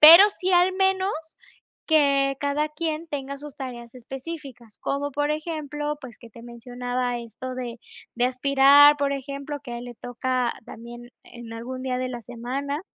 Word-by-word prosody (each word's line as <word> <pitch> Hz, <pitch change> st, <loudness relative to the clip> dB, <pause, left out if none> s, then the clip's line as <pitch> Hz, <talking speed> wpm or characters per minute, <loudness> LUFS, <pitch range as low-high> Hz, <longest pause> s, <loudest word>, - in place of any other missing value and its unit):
pero 330 Hz, +5 st, +12 dB
sí 370 Hz, -1 st, -2 dB
al 360 Hz, +1 st, +5 dB
menos 385 Hz, 0 st, +2 dB, 0.8 s
que 275 Hz, -3 st, +4 dB
cada 290 Hz, +2 st, 0 dB
quien 315 Hz, +1 st, -3 dB
tenga 280 Hz, -1 st, -4 dB
sus 295 Hz, -1 st, -10 dB
tareas 240 Hz, -3 st, -7 dB
específicas. 260 Hz, -3 st, -8 dB
Como 285 Hz, +1 st, -2 dB
por 290 Hz, +1 st, 0 dB
ejemplo, 300 Hz, -2 st, -3 dB
pues 245 Hz, -5 st, -10 dB
que 235 Hz, -2 st, -14 dB
te 230 Hz, -, -13 dB
mencionaba 245 Hz, +1 st, -3 dB
esto 245 Hz, +3 st, -7 dB
de 240 Hz, -2 st, -5 dB, 0.3 s
de 240 Hz, +1 st, +1 dB
aspirar, 275 Hz, +3 st, +6 dB
por 280 Hz, 0 st, 0 dB
ejemplo, 280 Hz, +1 st, -5 dB
que 240 Hz, -, -7 dB
a 235 Hz, -, -4 dB
él 240 Hz, -, -8 dB
le 240 Hz, -, -8 dB
toca 245 Hz, +1 st, -1 dB
también 240 Hz, +2 st, -10 dB
en 235 Hz, -1 st, -10 dB
algún 255 Hz, +3 st, -6 dB
día 255 Hz, -1 st, -1 dB
de 255 Hz, 0 st, -2 dB
la 240 Hz, -1 st, -5 dB
semana. 265 Hz, -, -4 dB
270 Hz, 165 wpm, -25 LUFS, 245-295 Hz, 0.8 s, pero